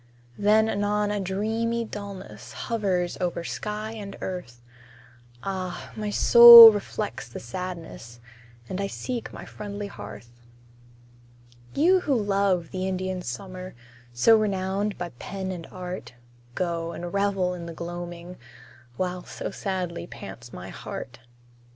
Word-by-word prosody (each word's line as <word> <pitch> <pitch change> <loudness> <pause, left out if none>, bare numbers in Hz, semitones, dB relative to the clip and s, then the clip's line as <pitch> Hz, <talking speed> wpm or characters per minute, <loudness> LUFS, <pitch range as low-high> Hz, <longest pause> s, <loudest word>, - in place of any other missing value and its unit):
Then 215 +2 +4
anon 205 0 0
a 205 - -1
dreamy 220 +5 -1
dullness 200 - -9
Hovers 190 -6 -2
over 175 -1 -2
sky 210 +4 -4
and 205 -3 -8
earth; 180 -11 -6 0.8
Ah! 185 -2 -5
my 210 -1 -3
soul 235 +1 +11
reflects 205 - -4
the - - -7
sadness, 165 -5 -7 0.5
And 185 +7 -4
I 195 - -1
seek 240 +3 -5
my - - -9
friendly 205 0 -7
hearth. 110 - -10 1.4
You 360 +6 +4
who 295 -6 0
love 195 -5 +1
the 185 0 -3
Indian 185 0 -3
summer, 185 +7 -7 0.4
So 120 - +5
renowned 200 0 -1
by 175 - -4
pen 190 -1 -5
and 175 -3 -7
art, 180 -8 -7 0.4
Go, 170 -2 -2
and 175 0 -6
revel 200 -2 +1
in 170 -1 -7
the 170 - -7
gloaming, 175 +1 -7 0.6
While 180 -1 -2
so - - -6
sadly 185 -3 -4
pants - - -10
my - - -8
heart. 120 - -8
190 Hz, 125 wpm, -25 LUFS, 175-210 Hz, 1.4 s, soul